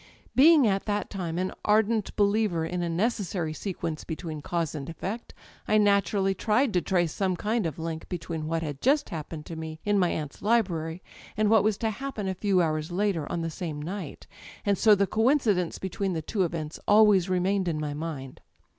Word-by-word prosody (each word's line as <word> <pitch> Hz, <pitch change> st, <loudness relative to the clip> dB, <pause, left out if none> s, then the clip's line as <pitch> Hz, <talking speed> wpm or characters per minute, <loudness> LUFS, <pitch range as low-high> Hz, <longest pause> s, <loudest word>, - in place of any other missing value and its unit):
Being 300 Hz, +1 st, +7 dB
at 195 Hz, -2 st, +1 dB
that 205 Hz, -1 st, -2 dB
time 175 Hz, -4 st, -3 dB
an 185 Hz, +1 st, -1 dB
ardent 215 Hz, 0 st, +2 dB
believer 200 Hz, -5 st, +2 dB
in 180 Hz, +2 st, -3 dB
a 170 Hz, -, -1 dB
necessary 180 Hz, -3 st, -1 dB
sequence 170 Hz, -3 st, -4 dB
between 160 Hz, -2 st, -5 dB
cause 170 Hz, 0 st, -2 dB
and 145 Hz, -2 st, -6 dB
effect 195 Hz, +8 st, -5 dB, 0.4 s
I 215 Hz, -, +4 dB
naturally 200 Hz, -1 st, +3 dB
tried 220 Hz, +5 st, +1 dB
to 180 Hz, -, +2 dB
trace 175 Hz, -4 st, +1 dB
some 190 Hz, -2 st, 0 dB
kind 215 Hz, +1 st, 0 dB
of 155 Hz, -, -6 dB
link 160 Hz, -1 st, -5 dB
between 165 Hz, -3 st, -4 dB
what 165 Hz, +1 st, -1 dB
had 145 Hz, -3 st, -5 dB
just 290 Hz, +3 st, +2 dB
happened 155 Hz, -3 st, -6 dB
to 165 Hz, -, -7 dB
me'in 160 Hz, +6 st, -2 dB
my 180 Hz, -2 st, +3 dB
aunt's 150 Hz, -2 st, -4 dB
library, 180 Hz, -7 st, 0 dB, 0.3 s
and 215 Hz, 0 st, +2 dB
what 220 Hz, -2 st, +6 dB
was 215 Hz, -1 st, +1 dB
to 225 Hz, -1 st, -1 dB
happen 245 Hz, -4 st, -5 dB
a 190 Hz, -, 0 dB
few 185 Hz, -1 st, +2 dB
hours 155 Hz, 0 st, -1 dB
later 180 Hz, -5 st, -1 dB
on 170 Hz, -, -1 dB
the 165 Hz, 0 st, -3 dB
same 160 Hz, -3 st, -5 dB
night; 170 Hz, 0 st, -6 dB, 0.4 s
and 200 Hz, -1 st, +3 dB
so 210 Hz, +2 st, +5 dB
the 200 Hz, 0 st, +2 dB
coincidence 220 Hz, -, +2 dB
between 190 Hz, 0 st, -2 dB
the 160 Hz, -2 st, -3 dB
two 200 Hz, +5 st, -2 dB
events 155 Hz, -2 st, -5 dB
always 205 Hz, -3 st, +5 dB
remained 185 Hz, +1 st, +1 dB
in 160 Hz, -3 st, -1 dB
my 150 Hz, -1 st, -3 dB
mind. 145 Hz, -4 st, -6 dB
185 Hz, 190 wpm, -27 LUFS, 165-210 Hz, 0.4 s, Being